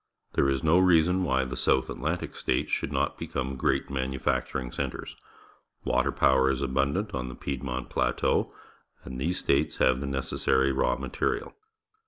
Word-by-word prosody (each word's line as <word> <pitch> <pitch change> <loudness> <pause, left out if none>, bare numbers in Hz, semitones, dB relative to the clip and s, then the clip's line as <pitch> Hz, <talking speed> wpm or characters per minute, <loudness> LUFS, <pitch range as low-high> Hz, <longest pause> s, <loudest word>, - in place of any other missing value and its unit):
There 70 - +3
is 70 -2 0
no 80 +3 +5
reason 90 0 +4
why 65 -5 +1
the 65 - -5
South 65 - +2
Atlantic - - -3
States - - -1
should - - -1
not - - -1
become 65 0 -3
great 65 - 0
manufactur 65 -1 -1
ing 65 -2 -6
centres. - - -4 0.7
Water - - +1
power 65 0 +3
is 70 0 -1
abundant 70 +10 0
on 65 -1 -3
the 65 - -8
Piedmont 65 -2 -4
Plateau, - - +1 0.5
and 65 0 -6
these 90 +5 0
states 70 +3 +1
have 65 0 +3
the 70 - -4
necessary 65 0 +1
raw 65 -2 +1
material. - - -2
65 Hz, 160 wpm, -28 LUFS, 65-70 Hz, 0.7 s, no